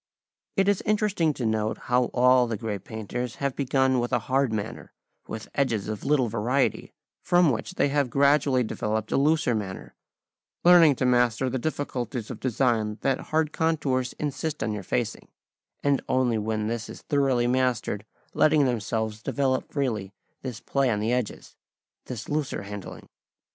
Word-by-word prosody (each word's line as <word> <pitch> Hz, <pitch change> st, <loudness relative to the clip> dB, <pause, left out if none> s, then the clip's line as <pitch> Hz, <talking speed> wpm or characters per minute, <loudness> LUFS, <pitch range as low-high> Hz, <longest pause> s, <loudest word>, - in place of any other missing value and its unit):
It 195 Hz, 0 st, +3 dB
is 205 Hz, -2 st, +2 dB
interesting 210 Hz, -6 st, +1 dB
to 125 Hz, -, -3 dB
note 110 Hz, 0 st, 0 dB
how 125 Hz, 0 st, +1 dB
all 125 Hz, 0 st, +4 dB
the 115 Hz, -2 st, -2 dB
great 105 Hz, -3 st, -4 dB
painters 115 Hz, +2 st, -5 dB
have 140 Hz, -2 st, -2 dB
begun 130 Hz, -1 st, +2 dB
with 120 Hz, +1 st, -2 dB
a 125 Hz, -, +3 dB
hard 135 Hz, -1 st, +1 dB
manner, 105 Hz, -2 st, -5 dB, 0.4 s
with 110 Hz, -1 st, -6 dB
edges 115 Hz, -8 st, 0 dB
of 105 Hz, -2 st, -4 dB
little 140 Hz, -4 st, +2 dB
variety, 115 Hz, +5 st, 0 dB, 0.3 s
from 175 Hz, -4 st, +4 dB
which 125 Hz, +10 st, -4 dB
they 145 Hz, -, +2 dB
have 140 Hz, -2 st, +1 dB
gradually 140 Hz, -1 st, +3 dB
developed 110 Hz, -1 st, -2 dB
a -, -, +2 dB
looser 150 Hz, -2 st, +3 dB
manner, 100 Hz, -4 st, -5 dB, 0.7 s
learning 170 Hz, -5 st, +7 dB
to 130 Hz, -, -1 dB
master 125 Hz, 0 st, +2 dB
the 130 Hz, -, -1 dB
difficulties 125 Hz, -5 st, -3 dB
of -, -, -7 dB
design 115 Hz, -4 st, 0 dB
that 135 Hz, -1 st, +1 dB
hard 155 Hz, -1 st, +1 dB
contours 140 Hz, -6 st, 0 dB
insist 150 Hz, +1 st, -3 dB
on 110 Hz, -, -1 dB
your 105 Hz, -1 st, -3 dB
facing, 60 Hz, -9 st, -2 dB, 0.6 s
and 140 Hz, -1 st, +2 dB
only 125 Hz, -3 st, +2 dB
when 110 Hz, 0 st, -2 dB
this 115 Hz, 0 st, -3 dB
is -, -, -10 dB
thoroughly 135 Hz, -4 st, +2 dB
mastered 125 Hz, -5 st, 0 dB, 0.3 s
letting 155 Hz, -2 st, +4 dB
themselves 110 Hz, -2 st, -2 dB
develop 130 Hz, +1 st, -1 dB
freely 115 Hz, -9 st, -2 dB, 0.3 s
this 125 Hz, -4 st, -5 dB
play 135 Hz, 0 st, 0 dB
on 105 Hz, -3 st, 0 dB
the 110 Hz, +3 st, 0 dB
edges, 125 Hz, -3 st, -3 dB, 0.5 s
this 120 Hz, -3 st, -6 dB
looser 145 Hz, -8 st, -2 dB
handling. 100 Hz, 0 st, -8 dB
125 Hz, 160 wpm, -26 LUFS, 110-140 Hz, 0.7 s, learning